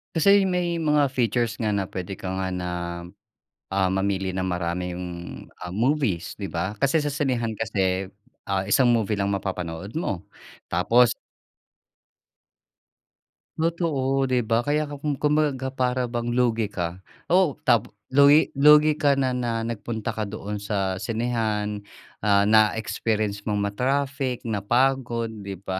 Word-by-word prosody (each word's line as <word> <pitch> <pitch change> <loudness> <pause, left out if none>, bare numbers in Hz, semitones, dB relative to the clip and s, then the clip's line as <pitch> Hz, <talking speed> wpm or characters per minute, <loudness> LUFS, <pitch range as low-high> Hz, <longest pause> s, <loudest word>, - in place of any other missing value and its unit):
Kasi 200 +4 +5
may 175 -2 0
mga 150 -3 +2
features 120 -2 0
nga 110 -2 0
na 100 - 0
puwede 95 +1 -5
ka 95 - -7
nga 95 0 -2
na, 85 -1 -4 0.6
ah, 95 -1 +2
mamili 95 0 0
ng 95 -1 -1
maraming, 90 0 -3 0.5
um, 90 0 -9
movies, 115 - 0
'di 100 - -3
ba? 90 +5 -2
Kasi 140 +3 +2
sa 145 - -1
sinehan 125 -5 -1
kasi, 95 -4 0 0.4
ah, 95 -1 0
isang 125 +4 +4
movie 110 -3 +1
lang 100 - +1
mapapanood 95 -1 -4
mo 100 - -3 0.5
tapos 115 +8 +4 2.4
Totoo, 145 -5 0
'di 125 -1 +1
ba, 115 +1 +1
kaya 145 +5 +1
ka 145 -1 -7
kum 145 0 -1
kumbaga 150 +1 +2
ga 130 0 -4
para 125 -1 0
bang 120 0 -2
lugi 115 -3 +2
ka. 90 -2 -4 0.3
Oh, 180 -6 +4
tap 115 - +3 0.2
lugi 145 +3 +6
lugi 150 +1 +7
ka 145 -1 +4
na 130 -2 +1
na 120 -2 -1
nagpunta 115 0 -4
ka 110 -1 -3
doon 105 0 -5
sa 95 -2 -2
sinehan, 110 -2 -1 0.4
ah, 100 -1 +4
na-experience 110 -1 +1
mong 105 -1 0
ma-traffic, 135 +1 -1
napagod, 115 +2 0
'di 100 -1 -6
ba? 95 -1 -3
115 Hz, 140 wpm, -24 LUFS, 100-135 Hz, 2.4 s, lugi